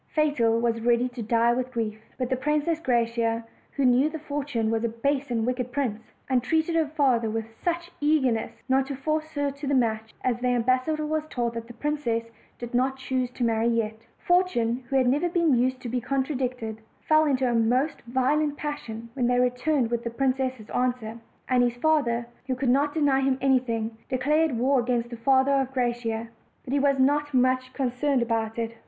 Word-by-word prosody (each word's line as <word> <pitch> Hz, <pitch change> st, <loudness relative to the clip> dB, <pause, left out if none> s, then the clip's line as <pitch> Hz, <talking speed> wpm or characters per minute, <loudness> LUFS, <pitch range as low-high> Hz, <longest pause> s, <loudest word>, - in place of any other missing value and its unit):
Fatal 255 Hz, -7 st, +2 dB
was 230 Hz, -1 st, 0 dB
ready 240 Hz, +1 st, +2 dB
to 245 Hz, -1 st, -7 dB
die 230 Hz, +2 st, +2 dB
with 255 Hz, +1 st, -2 dB
grief; 220 Hz, -3 st, -3 dB, 0.2 s
but 255 Hz, 0 st, -3 dB
the -, -, +3 dB
Princess 300 Hz, +4 st, 0 dB
Graciosa, 230 Hz, -4 st, 0 dB, 0.3 s
who 280 Hz, -, 0 dB
knew 255 Hz, +4 st, +4 dB
that 315 Hz, -1 st, -7 dB
Fortune 285 Hz, -7 st, -2 dB
was 225 Hz, 0 st, 0 dB
a 235 Hz, -, +1 dB
base 275 Hz, +5 st, -1 dB
and 230 Hz, -2 st, 0 dB
wicked 250 Hz, 0 st, -2 dB
prince, 240 Hz, -6 st, -2 dB, 0.3 s
entreated 315 Hz, +6 st, +1 dB
her 320 Hz, -2 st, +2 dB
father 265 Hz, -7 st, +1 dB
with 225 Hz, 0 st, -2 dB, 0.2 s
such 345 Hz, 0 st, -2 dB
ear 305 Hz, +1 st, +4 dB
nestness, 225 Hz, -1 st, -2 dB, 0.2 s
not 265 Hz, 0 st, +2 dB
to 280 Hz, -, -4 dB
force 310 Hz, +3 st, -2 dB
her 285 Hz, -1 st, 0 dB
to 280 Hz, +1 st, -7 dB
the 280 Hz, -, +2 dB
match 220 Hz, -3 st, 0 dB
that 245 Hz, -1 st, 0 dB
the 250 Hz, -, +1 dB
ambas 255 Hz, +2 st, +2 dB
sador 305 Hz, -1 st, -1 dB
was 310 Hz, 0 st, -2 dB
told 240 Hz, -2 st, -2 dB
the 230 Hz, -, -3 dB
princess 235 Hz, -4 st, -2 dB, 0.3 s
did 240 Hz, 0 st, -7 dB
not 260 Hz, +2 st, +1 dB
choose 260 Hz, -1 st, -2 dB
to 250 Hz, 0 st, -5 dB
marry 225 Hz, 0 st, +2 dB
yet. 225 Hz, -1 st, -1 dB
Fortune, 260 Hz, -10 st, +1 dB
who 270 Hz, -, -1 dB
had 260 Hz, -2 st, +4 dB
never 295 Hz, +7 st, +2 dB
been 335 Hz, -4 st, +2 dB
used 255 Hz, +1 st, +1 dB
to 250 Hz, -, -6 dB
be 245 Hz, +1 st, -2 dB
contradicted, 255 Hz, -5 st, -2 dB, 0.3 s
fell 310 Hz, 0 st, +5 dB
into 265 Hz, -3 st, +1 dB
a 240 Hz, -, +1 dB
most 245 Hz, +6 st, +1 dB
violent 285 Hz, +4 st, +1 dB
passion 235 Hz, -7 st, -5 dB
when 245 Hz, -2 st, 0 dB
they 245 Hz, 0 st, +2 dB
returned 250 Hz, 0 st, +1 dB
with 235 Hz, 0 st, -1 dB
the 235 Hz, -, -2 dB
princess' 260 Hz, -2 st, -1 dB
answer; 245 Hz, -3 st, -1 dB, 0.3 s
and 255 Hz, -1 st, +3 dB
his 240 Hz, -1 st, +1 dB
father, 245 Hz, -4 st, +1 dB, 0.2 s
who 260 Hz, -, 0 dB
could 255 Hz, 0 st, -1 dB
not 285 Hz, +4 st, +2 dB
deny 285 Hz, -4 st, +3 dB
him 265 Hz, -1 st, +1 dB
anything, 235 Hz, -4 st, +1 dB
declared 285 Hz, +2 st, +1 dB
war 260 Hz, +3 st, +3 dB
against 240 Hz, -1 st, -1 dB
the -, -, -4 dB
father 265 Hz, +3 st, +3 dB
of 270 Hz, -1 st, +1 dB
Gra 250 Hz, -2 st, +1 dB
ciosa. 230 Hz, -1 st, -4 dB, 0.3 s
But 260 Hz, -, -5 dB
he 285 Hz, -, +3 dB
was 275 Hz, 0 st, +3 dB
not 290 Hz, +2 st, +2 dB
much 255 Hz, 0 st, +2 dB
concerned 260 Hz, 0 st, 0 dB
about 225 Hz, -1 st, -2 dB
it. 230 Hz, 0 st, -3 dB
255 Hz, 200 wpm, -26 LUFS, 235-285 Hz, 0.3 s, fell